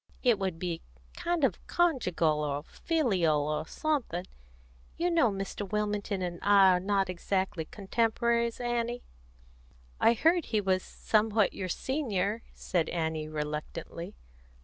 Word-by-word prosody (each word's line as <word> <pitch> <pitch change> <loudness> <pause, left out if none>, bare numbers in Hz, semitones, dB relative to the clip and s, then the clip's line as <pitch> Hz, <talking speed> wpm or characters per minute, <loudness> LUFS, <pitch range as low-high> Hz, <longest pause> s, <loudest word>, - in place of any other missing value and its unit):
It 240 -5 +4
would 190 -4 -2
be 170 -1 -3 0.3
kind 345 -2 -1
of - - +2
conjugal, 180 - +2
or 145 0 -2
filial, 180 - +1
or 155 +1 -2
something. 270 - -1 0.7
You 350 +1 +1
know 325 -9 +4
Mr. 195 0 -4
Wilmington 210 -2 -1
and 175 -1 -4
I 200 -1 +6
are 180 - +2
not 195 +1 +1
exactly 185 -1 -1
contemporaries, 230 +4 0
Annie?" 240 0 -1 1.0
"I 230 - +5
heard 330 +7 +3
he 215 - 0
was 190 -2 +1
somewhat 215 0 +1
your 185 -1 -4
senior," 220 - -1
said 170 -3 -1
Annie 160 -2 -2
reluctantly. 150 - -5
200 Hz, 125 wpm, -30 LUFS, 175-235 Hz, 1.0 s, I